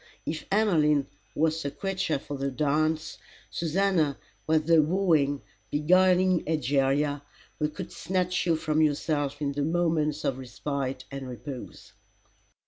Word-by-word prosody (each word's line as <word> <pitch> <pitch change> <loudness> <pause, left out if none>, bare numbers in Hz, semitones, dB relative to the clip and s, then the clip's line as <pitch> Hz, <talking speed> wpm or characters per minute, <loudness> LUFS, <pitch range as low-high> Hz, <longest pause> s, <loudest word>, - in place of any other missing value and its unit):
If 155 0 -4
Emmeline 155 -9 +3 0.3
was 160 +1 +1
the 140 - -2
creature 185 0 -2
for 145 +1 -7
the 140 0 -2
dance, 155 +3 0 0.3
Susannah 165 -3 +1 0.3
was 155 0 +3
the 165 0 +5
wooing, 155 - +2 0.3
beguiling 185 +3 +4
Egeria, 145 -1 +1 0.4
who 150 -1 +1
could 185 +3 -7
snatch 180 0 -1
you 165 - +4
from 155 -1 0
yourself 145 -1 0
in 140 - 0
the 145 +1 -3
moments 155 -1 +1
of 130 -1 0
respite 130 +1 -4
and 135 -1 -6
repose. 125 +1 -8
155 Hz, 130 wpm, -27 LUFS, 140-170 Hz, 0.4 s, the